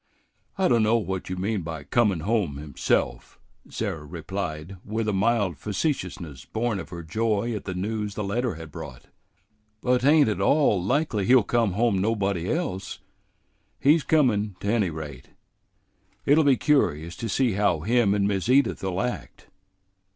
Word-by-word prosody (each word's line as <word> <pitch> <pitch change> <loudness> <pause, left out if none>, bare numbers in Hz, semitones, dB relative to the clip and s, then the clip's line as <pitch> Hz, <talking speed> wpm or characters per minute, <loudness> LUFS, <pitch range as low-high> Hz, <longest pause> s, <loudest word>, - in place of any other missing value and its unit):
"I 190 -1 +3
dunno 115 -1 +3
what 95 -5 -4
you 95 - -2
mean 100 +2 -1
by 80 -3 -6
comin' 100 - +1
home 100 -7 0
himself," 70 -4 -2 0.3
Sarah 80 - -4
replied, 85 +1 -5
with 110 +1 -3
a 105 - +1
mild 100 - +1
facetiousness 90 - -3
born 110 -2 -2
of - - -8
her 85 -1 -7
joy 110 +5 -1
at 105 - -5
the 95 -2 -4
news 105 +1 -3
the 105 - -3
letter 115 +1 -1
had 80 -1 -10
brought; 70 -7 -9 0.7
"but 125 +2 +1
't 130 - +2
ain't 150 -3 +6
at 105 - -1
all 140 - +3
likely 110 - 0
he'll 130 -3 +6
come 115 -2 +1
home 110 -1 +2
nobody 100 -4 0
else. 100 - -3 0.8
He's 150 +4 +4
comin', 110 - +2
't 100 - -1
any 110 -6 +2
rate. 75 -5 -8 1.0
It'll 150 +3 +5
be 140 -3 +4
curious 85 - +1
to 115 -2 -4
see 125 +3 +2
how 95 -5 +1
him 110 +1 +2
and 100 -1 +2
Miss 100 +2 -1
Edith 135 -4 +3
'll 95 -1 -2
act. 125 0 -5
100 Hz, 160 wpm, -25 LUFS, 90-120 Hz, 1.0 s, ain't